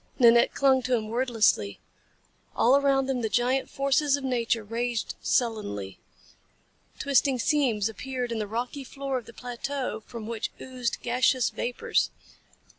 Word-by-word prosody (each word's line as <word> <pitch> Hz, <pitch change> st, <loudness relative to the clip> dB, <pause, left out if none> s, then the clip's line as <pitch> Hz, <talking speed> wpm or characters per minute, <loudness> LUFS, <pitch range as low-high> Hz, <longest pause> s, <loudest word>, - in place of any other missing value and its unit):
Nanette 235 Hz, -2 st, +5 dB
clung 265 Hz, -1 st, +4 dB
to 255 Hz, 0 st, +1 dB
him 215 Hz, -2 st, -3 dB
wordlessly. 225 Hz, -, +1 dB, 0.8 s
All 250 Hz, +4 st, +5 dB
around 275 Hz, -1 st, +3 dB
them 260 Hz, -2 st, -1 dB
the 220 Hz, -, -1 dB
giant 250 Hz, +4 st, +1 dB
forces 275 Hz, +1 st, +2 dB
of 280 Hz, -, -8 dB
nature 235 Hz, -3 st, 0 dB
raged 230 Hz, +2 st, -2 dB
sullenly. 105 Hz, -, -1 dB, 1.0 s
Twisting 275 Hz, -1 st, +2 dB
seams 245 Hz, -6 st, +1 dB
appeared 250 Hz, +2 st, -4 dB
in 230 Hz, -, -2 dB
the 210 Hz, -, -2 dB
rocky 245 Hz, +6 st, -4 dB
floor 275 Hz, 0 st, -3 dB
of 235 Hz, -, -16 dB
the -, -, -10 dB
plateau 245 Hz, 0 st, -4 dB
from 230 Hz, -2 st, -7 dB
which 225 Hz, -1 st, -3 dB
oozed 250 Hz, -2 st, -4 dB
gaseous 250 Hz, +1 st, +2 dB
vapors. 245 Hz, -, 0 dB
245 Hz, 140 wpm, -27 LUFS, 230-265 Hz, 1.0 s, Nanette